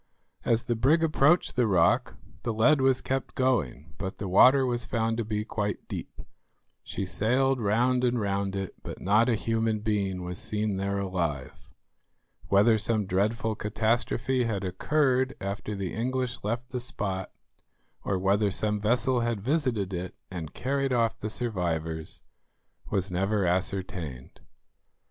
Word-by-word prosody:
As 115 0 +2
the 120 - -1
brig 145 +9 +3
approached 155 +2 +3
the 125 -2 +3
rock 105 +6 +2 0.2
the 120 - -2
lead 135 +6 +4
was 130 -1 +3
kept 135 0 -3
going, 80 - 0
but 95 -2 -4
the 100 - -4
water 130 +8 +6
was 120 -1 0
found 115 0 -1
to 115 - 0
be 105 0 -2
quite 105 -2 -3
deep. - - -7 0.6
She 100 - -4
sailed 130 +7 +1
round 120 +4 +2
and 120 -1 +2
round 100 -1 -1
it, 95 -1 -4
but - - -7
not 110 +5 +3
a 120 - +3
human 115 -1 0
being 100 -4 -1
was 90 0 -5
seen 105 -2 -2
there 100 +1 -1
alive. 85 -9 -3 0.8
Whether 105 +3 +4
some 110 0 0
dreadful 105 +4 0
catastrophe 115 +4 0
had 105 -4 -2
occurred 130 +7 +1
after 100 +2 -4
the 95 -2 -4
English 125 +2 -2
left 120 +4 -3
the 125 - -2
spot, 95 -6 -3 0.7
or 100 - 0
whether 100 +2 +2
some 105 +2 -1
vessel 120 +3 +2
had 115 -2 -1
visited 120 - 0
it 90 +1 -4 0.2
and 85 -4 -6
carried 135 +1 -1
off 115 -2 +1
the 110 - -3
survivors, 85 -9 -3 0.7
was 95 -1 -1
never 95 +2 +1
ascertained. 90 -7 -3
110 Hz, 150 wpm, -28 LUFS, 95-125 Hz, 0.8 s, water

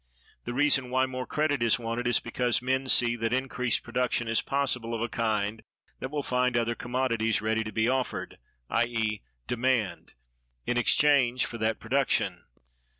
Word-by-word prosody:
The 120 - -4
reason 140 -2 +3
why 130 +1 +2
more 130 -1 -5
credit 150 -3 0
is 115 -2 +4
wanted 120 +1 -3
is 120 - +4
because 120 +1 0
men 130 +1 -1
see 120 -2 +4
that 115 0 -1
increased 125 -2 0
production 120 -1 -1
is 115 0 +2
possible 125 -4 -1
of 115 - -4
a 120 - 0
kind 110 -1 -1 0.4
that 130 - -4
will 145 0 -3
find 125 -1 +1
other 115 0 +1
commodities 115 -2 0
ready 110 +1 0
to 110 - -6
be 110 +2 +1
offered 130 0 -2 0.3
(i.e., 115 -3 0 0.2
demand) 120 -7 -1 0.5
in 120 - 0
exchange 130 0 +3
for 115 - -7
that 110 +1 0
production. 135 +4 0
120 Hz, 160 wpm, -28 LUFS, 115-130 Hz, 0.5 s, is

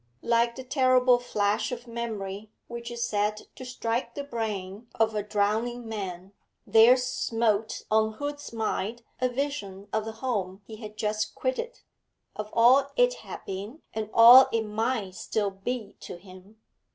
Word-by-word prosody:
Like 235 0 +2
the 260 - -7
terrible 255 -2 +4
flash 210 -3 0
of 240 0 -6
memory 215 -4 -5 0.2
which 235 0 -7
is 235 0 -2
said 210 0 -1
to - - -10
strike 245 -1 -3
the 285 - -4
brain 215 -4 -5
of 225 0 +2
a 210 - -1
drowning 220 +4 -1
man, 195 -3 -6 0.3
there 230 +3 +7
smote 225 -4 -1
on 220 0 +3
Hood's 290 +4 -5
mind 225 0 -3 0.2
a 255 0 +1
vision 245 -8 -4
of 220 0 0
the 220 - -5
home 210 -5 -3
he 220 - -10
had 215 -1 -10
just 215 0 -2
quitted, - - -3 0.5
of 210 0 -5
all 255 +4 +5
it - - +4
had - - -9
been 205 +10 -7
and 215 -1 -3
all 240 +3 +9
it 225 -1 +1
might 220 -2 -2
still 205 +1 -2
be 210 +2 -5
to - - -8
him. 185 +3 -16
225 Hz, 155 wpm, -27 LUFS, 210-245 Hz, 0.5 s, all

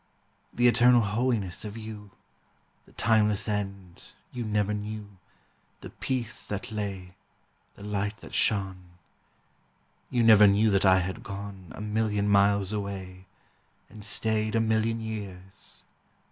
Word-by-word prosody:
The 120 0 +3
eternal 120 0 +6
holiness 105 -3 -1
of 105 +1 -7
you, 110 -2 -8 0.8
The - - -19
timeless 105 -1 +2
end, 100 -4 -5 0.2
you 125 - -3
never 105 -1 0
knew, 105 -1 -6 0.6
The - - -9
peace 120 -4 -3
that 100 +1 -5
lay, 100 -4 -5 0.6
the 100 - -12
light 105 +1 -2
that - - -12
shone. 95 -4 -1 1.1
You 120 -1 +1
never 105 -2 +8
knew 105 +2 +4
that 100 0 +2
I 95 -1 +6
had 95 +1 -4
gone 100 -2 -8
A - - -8
million 105 -1 0
miles 100 0 +3
away, 95 -2 -6 0.6
and 105 0 -11
stayed 110 +1 0
A - - +3
million 110 0 +1
years. 100 -3 -8
105 Hz, 130 wpm, -27 LUFS, 100-110 Hz, 1.1 s, never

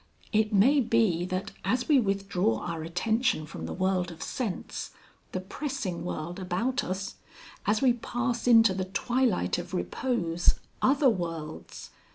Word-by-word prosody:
It 215 0 +3
may 240 +9 +5
be 225 -8 +2
that 185 +2 -3
as 245 +7 0
we 290 -3 +6
withdraw 195 - 0
our 165 -2 -4
attention 200 +3 0
from 150 - -7
the - - -5
world 185 -1 0
of 170 - -8
sense, 225 -8 -4 0.4
the 185 - -2
pressing 205 - -4
world 175 +1 -4
about 230 +9 -1
us, 190 +2 -4 0.5
as 215 +4 +2
we 255 -2 +6
pass 240 +1 -2
into 225 -4 +7
the 185 0 -2
twilight 200 - +1
of - - -6
repose, 170 - 0 0.3
other 275 +1 +4
worlds.... 165 -8 -3
195 Hz, 145 wpm, -28 LUFS, 175-240 Hz, 0.5 s, into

